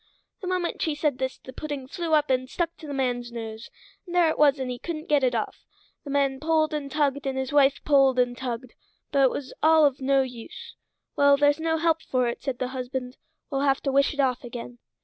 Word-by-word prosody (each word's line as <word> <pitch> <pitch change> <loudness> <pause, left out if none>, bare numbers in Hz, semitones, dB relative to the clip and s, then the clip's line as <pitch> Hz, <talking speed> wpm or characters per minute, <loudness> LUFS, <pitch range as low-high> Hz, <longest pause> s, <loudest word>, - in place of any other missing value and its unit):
The 370 - -5
moment 365 -1 -2
she 315 -2 0
said 295 -4 0
this 260 0 -2
the 260 - -12
pudding 285 -2 -5
flew 335 +1 0
up 300 -2 +2
and 255 0 0
stuck 335 +2 -2
to 315 - -10
the - - -6
man's 245 -3 -1
nose, 225 -1 -7 0.4
and 350 - -6
there 345 -2 +5
it - - -3
was 290 -1 +5
and 260 -2 -3
he 245 - -6
couldn't 315 +1 -5
get 290 -2 +3
it 250 -2 +2
off; 220 - -3 0.4
the 290 - -9
man 275 -1 +1
pulled 310 0 +1
and 290 -2 -3
tugged, 285 -2 0
and 265 0 -2
his 265 +2 -3
wife 280 -1 +4
pulled 275 -3 +4
and 245 -1 +2
tugged, 245 -1 -5 0.4
but 280 - +3
it 265 - +6
was 265 +1 -6
all 315 -1 +6
of 280 -1 +1
no 270 0 +3
use. 245 -3 -9 0.4
"Well, 285 0 +5
there's 290 +1 +3
no 320 0 0
help 325 0 +1
for 255 -4 0
it," 235 - -4
said 265 -3 -3
the 250 - -2
husband; 255 0 -5 0.3
"we'll 275 -1 0
have 275 -1 +2
to 275 - -1
wish 275 +1 +3
it - - -12
off 255 -2 +1
again." 240 0 -8
275 Hz, 235 wpm, -26 LUFS, 255-300 Hz, 0.4 s, it